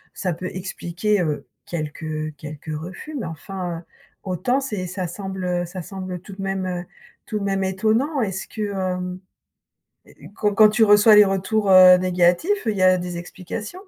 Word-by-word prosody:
ça 180 -3 -1
peut 180 +3 -5
expliquer, 185 +2 -1
heu, 155 -4 -2 0.2
quelques 155 -1 -4
quelques 150 +1 -8
refus, 185 - -8
mais 190 - -4
enfin, 175 +1 -5
heu, - - -14 0.4
autant 195 +8 0
c'est 210 -9 -4
ça 185 0 -4
semble, 190 +1 -5
heu, 175 -1 0
ça 180 +1 -7
semble 185 0 -6
tout 195 - -11
de 195 - -8
même, 195 -1 -2
heu, 180 -1 -3 0.4
tout 215 - -3
de 200 - -4
même 195 -1 0
étonnant. 220 +10 +1
Est-ce 190 -3 -3
que 215 - -7
hem, 180 -1 -3 1.2
quand 210 -1 +1
quand 215 0 +7
tu 225 +2 +2
reçois 210 +1 +7
les 210 - +9
retours, 195 +2 0
heu, 185 -1 +9
négatifs, 180 - +2
il 220 - +2
y 190 - 0
a 185 0 +5
des 175 -1 -5
explications? 185 +4 -7
185 Hz, 175 wpm, -22 LUFS, 175-205 Hz, 1.2 s, les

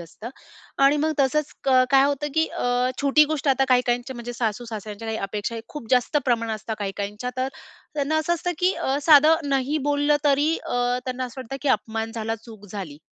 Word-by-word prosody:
असतं 190 +8 -9 0.5
आणि 275 +2 +6
मग 310 +2 +1
तसंच 285 +2 +1
क - - -1 0.2
काय 270 -1 +6
होतं, 285 +1 -1
की 320 0 +3
अ, 245 +1 0
छोटी 285 +2 +5
गोष्ट 300 -2 -1
आता 270 0 +3
काही-काहींच्या 250 0 +1
म्हणजे 240 0 -6
सासू-सासऱ्यांच्या 225 -2 -4
काही 220 - -2
अपेक्षा, 205 +3 -3
खूप 295 -6 -8
जास्त 250 +3 +2
प्रमाणात 230 -3 0
असतं, 220 +1 -5
काही-काहींच्या. 205 +4 -4
तर 255 +1 0 0.5
त्यांना 295 +1 0
असं 330 +2 +1
असतं, 355 +1 -2
की 365 +1 +3
अ, 270 - -1
साधं 310 +1 +6
नाही 275 +2 0
बोललं 290 +1 +3
तरी 290 +3 +3
अ, - - -6 0.3
त्यांना 255 0 -3
असं 250 +1 -8
वाटतं, 260 +2 -6
की 290 - 0
अपमान 225 -1 -1
झाला, 225 0 -2
चूक 220 -3 -12
झाली 180 -8 -6
255 Hz, 190 wpm, -24 LUFS, 225-290 Hz, 0.5 s, आणि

